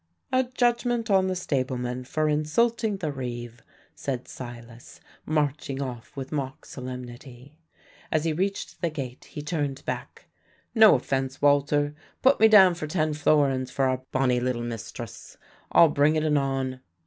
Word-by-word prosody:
"A 260 0 +3
judgment 240 -2 0
on 190 -1 +4
the 185 - -1
stableman 130 -6 -2
for 155 +4 0
insulting 210 +9 +1
the 160 -5 -3
reeve," 120 -3 -6 0.3
said 130 -3 -4
Silas, 120 -1 -10 0.3
marching 145 -2 -1
off 130 0 -6
with 135 -1 -6
mock 135 -3 -4
solemnity. 125 +2 -9 0.5
As 155 -1 +1
he 165 -1 0
reached 195 +5 -3
the 170 - +1
gate 135 -5 -7
he 150 -4 -8
turned 145 -4 -3
back. - - -5 0.5
"No 220 -2 +8
offence, 135 0 -2
Walter; 145 0 +3 0.3
put 265 +2 +5
me 220 - +8
down 195 -4 +7
for 165 -2 -5
ten 155 -1 0
florins 140 -4 +2
for 135 +1 0
our 130 0 0
bonnie 125 -2 +2
little 120 -1 -1
mistress. 115 -3 -7 0.3
I'll 165 - +7
bring 145 +1 +3
it 155 - +1
anon." 135 -3 0
145 Hz, 150 wpm, -26 LUFS, 130-160 Hz, 0.5 s, No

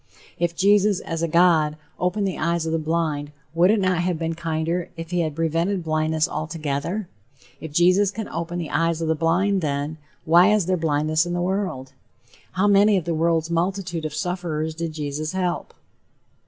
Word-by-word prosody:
If 170 0 0
Jesus 200 +1 +3
as 165 -1 -4
a 170 - +1
God 160 -2 +3 0.2
opened 195 +3 0
the 185 - -4
eyes 170 0 0
of 160 - -2
the 165 - +1
blind, 155 -2 -1 0.2
would 175 +3 +4
it 215 +1 +4
not 185 -2 +1
have 175 -1 0
been 165 0 -2
kinder 165 +2 -2
if 165 +1 -7
he 180 - 0
had 155 -3 -1
prevented 165 +4 0
blindness 155 0 +1
altogether? 155 +5 -3 0.5
If 160 0 -8
Jesus 180 +5 +4
can 205 +2 -5
open 170 +1 -4
the 170 -3 -4
eyes 165 -1 +1
of - - -1
the 160 - +3
blind, 180 +5 +1
then, 145 +1 -2 0.3
why 175 +5 +6
is 210 -4 +2
there 185 +1 +1
blindness 155 0 +1
in 175 - -3
the 175 - -1
world? 180 -9 -2 0.6
How 190 +2 +1
many 205 0 +5
of 175 - -2
the 170 - -1
world's 165 0 +1
multitude 175 -1 -1
of 150 -1 -4
sufferers 160 -3 -2
did 165 0 -4
Jesus 150 +1 -4
help? 180 -2 -2
170 Hz, 185 wpm, -23 LUFS, 155-180 Hz, 0.6 s, why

